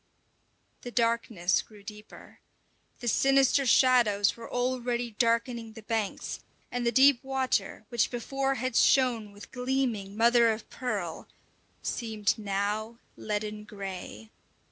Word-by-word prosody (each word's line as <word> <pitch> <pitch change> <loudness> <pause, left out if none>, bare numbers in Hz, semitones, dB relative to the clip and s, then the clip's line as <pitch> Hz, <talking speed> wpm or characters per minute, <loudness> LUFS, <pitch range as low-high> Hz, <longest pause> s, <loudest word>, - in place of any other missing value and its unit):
The 245 - -7
darkness 230 -6 +1
grew 210 -2 -17
deeper 210 0 -12 0.6
The 240 - -5
sinister 270 +2 +3
shadows 235 -6 +4
were 230 -1 -10
already 245 -1 -1
darkening 230 -1 0
the 225 -1 -11
banks, 220 -2 -3 0.3
and 245 -1 -1
the - - +3
deep 265 +1 +5
water, 260 -6 -1
which 235 -2 +1
before 270 +3 -2
had 255 0 -3
shone 240 -6 +3
with 205 0 -13
gleaming 250 -6 -2
mother 235 0 +5
of 220 0 -5
pearl, 200 -10 -4 0.6
seemed 220 -3 -1
now 210 +3 -2 0.2
leaden 210 0 -4
grey. 190 - -8
230 Hz, 120 wpm, -28 LUFS, 210-250 Hz, 0.6 s, deep